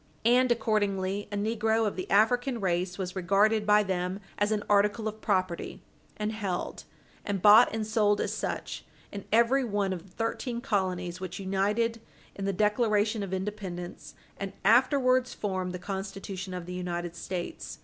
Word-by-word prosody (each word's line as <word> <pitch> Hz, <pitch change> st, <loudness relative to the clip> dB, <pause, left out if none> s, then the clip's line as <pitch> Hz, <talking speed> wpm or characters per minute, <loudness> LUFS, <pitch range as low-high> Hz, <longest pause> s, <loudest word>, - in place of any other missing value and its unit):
And, 250 Hz, +1 st, +4 dB
accordingly, 205 Hz, -3 st, 0 dB
a 205 Hz, -, -2 dB
negro 220 Hz, +1 st, +1 dB
of 210 Hz, -, -1 dB
the 185 Hz, -, -5 dB
African 245 Hz, +4 st, +3 dB
race 180 Hz, -1 st, -1 dB
was 185 Hz, -1 st, -4 dB
regarded 205 Hz, +4 st, +2 dB
by 210 Hz, 0 st, +5 dB
them 185 Hz, 0 st, -2 dB, 0.2 s
as 205 Hz, +1 st, +2 dB
an 210 Hz, -1 st, 0 dB
article 210 Hz, +2 st, +2 dB
of 215 Hz, 0 st, -6 dB
property, 185 Hz, -4 st, -1 dB, 0.4 s
and 210 Hz, 0 st, -1 dB
held, 200 Hz, -5 st, -4 dB, 0.4 s
and 200 Hz, -1 st, -2 dB
bought 215 Hz, +5 st, +8 dB
and 220 Hz, -1 st, -2 dB
sold 210 Hz, -1 st, +2 dB
as -, -, -1 dB
such, -, -, -4 dB, 0.3 s
in 200 Hz, -, -7 dB
every 235 Hz, +5 st, +4 dB
one 205 Hz, -4 st, 0 dB
of 175 Hz, -, -5 dB
the 190 Hz, -, -19 dB
thirteen 235 Hz, +3 st, -3 dB
colonies 185 Hz, -7 st, -1 dB
which 185 Hz, -1 st, -5 dB
united 210 Hz, +4 st, 0 dB, 0.3 s
in 195 Hz, -, -5 dB
the 195 Hz, -, +1 dB
Declaration 210 Hz, +1 st, +1 dB
of 195 Hz, -2 st, -4 dB
Independence 190 Hz, -2 st, -5 dB, 0.2 s
and 195 Hz, -1 st, -4 dB
afterwards 255 Hz, +2 st, +4 dB
formed 185 Hz, -3 st, -2 dB
the 180 Hz, -, -4 dB
Constitution 195 Hz, -1 st, -5 dB
of 180 Hz, -1 st, -5 dB
the 180 Hz, -, -7 dB
United 175 Hz, -1 st, -4 dB
States. 175 Hz, 0 st, -5 dB
205 Hz, 160 wpm, -28 LUFS, 185-220 Hz, 0.4 s, bought